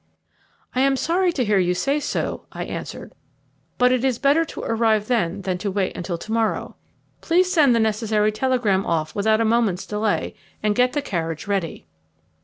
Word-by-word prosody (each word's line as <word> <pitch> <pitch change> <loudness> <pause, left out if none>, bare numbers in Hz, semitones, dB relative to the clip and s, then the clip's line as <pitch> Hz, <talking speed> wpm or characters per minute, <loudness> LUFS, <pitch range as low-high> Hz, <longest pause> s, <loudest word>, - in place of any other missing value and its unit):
"I 255 - +1
am 275 0 +3
sorry 355 +5 +1
to 255 -5 0
hear 205 -2 +3
you 180 -1 +1
say 275 +9 0
so," - - -3
I - - -5
answered; - - -7 0.6
"but 250 0 +4
it 255 -1 +1
is 260 -3 +1
better 285 +5 +3
to - - -8
arrive 225 -2 +1
then 200 -5 0
than 185 -1 -2
to 200 +1 -2
wait 195 -1 -1
until 175 -1 -4
to 215 - -9
morrow. 225 -1 -1 0.5
Please 360 +2 +2
send 285 -8 +4
the - - +3
necessary 215 -1 +1
telegram 215 -4 +1
off 155 -3 -1
without 220 +2 +2
a - - +2
moment's 220 -5 +1
delay, 210 0 -1 0.3
and 210 -1 +2
get 250 +3 +2
the 290 - -1
carriage 165 - -3
ready." 195 - -3
220 Hz, 185 wpm, -22 LUFS, 195-255 Hz, 0.6 s, but